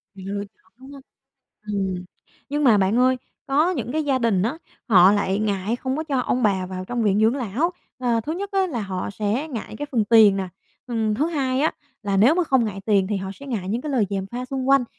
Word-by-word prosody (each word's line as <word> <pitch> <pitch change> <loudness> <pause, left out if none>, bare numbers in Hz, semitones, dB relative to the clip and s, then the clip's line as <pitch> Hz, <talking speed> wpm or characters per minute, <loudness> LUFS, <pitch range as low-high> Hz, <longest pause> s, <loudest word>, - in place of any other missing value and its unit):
Lựa 200 +1 -5
chọn, - - -33
đúng 265 +1 -13
hông? 280 -1 -11 0.7
Ừm, 190 -3 -2 0.4
nhưng 295 +1 -1
mà 225 -6 +6
bạn 195 +4 +2
ơi, 255 +1 +4 0.3
có 300 +6 +2
những 280 -8 -3
cái 310 -1 0
gia 270 -2 +1
đình 220 -6 +1
á, 260 +9 -1 0.3
họ 190 -2 +7
lại 200 -1 0
ngại 210 +1 -1
không 260 +2 -3
có 315 - -3
cho 280 -4 -1
ông 250 0 -1
bà 190 -3 +1
vào 185 0 -6
trong 240 +3 -2
viện 205 -1 +2
dưỡng 225 +5 +3
lão. 260 - -1 0.3
À, 240 -3 +1
thứ 305 +8 -4
nhất 395 +3 -4
á, 385 -1 +2
là 255 -10 -3
họ 190 -2 -4
sẽ 220 +9 -2
ngại 230 -5 -6
cái 290 - -3
phần 225 -4 +2
tiền 215 -3 +6
nè, 190 -1 -3 0.4
ừm, 225 -3 0
thứ 290 +8 +1
hai 270 -5 -1
á, 315 - +2 0.3
là 200 -1 -1
nếu 235 +11 +5
mà 360 -1 +1
không 265 -5 +2
ngại 195 -3 -4
tiền 200 -3 +3
thì 205 - -1
họ 190 0 -4
sẽ 280 - -12
ngại 205 -8 -3
những 230 +4 -1
cái 300 -2 -4
lời 225 -6 +2
gièm 195 -1 -2
pha 245 +5 -5
xung 265 0 -3
quanh, 275 -2 +5
230 Hz, 245 wpm, -23 LUFS, 200-270 Hz, 0.7 s, họ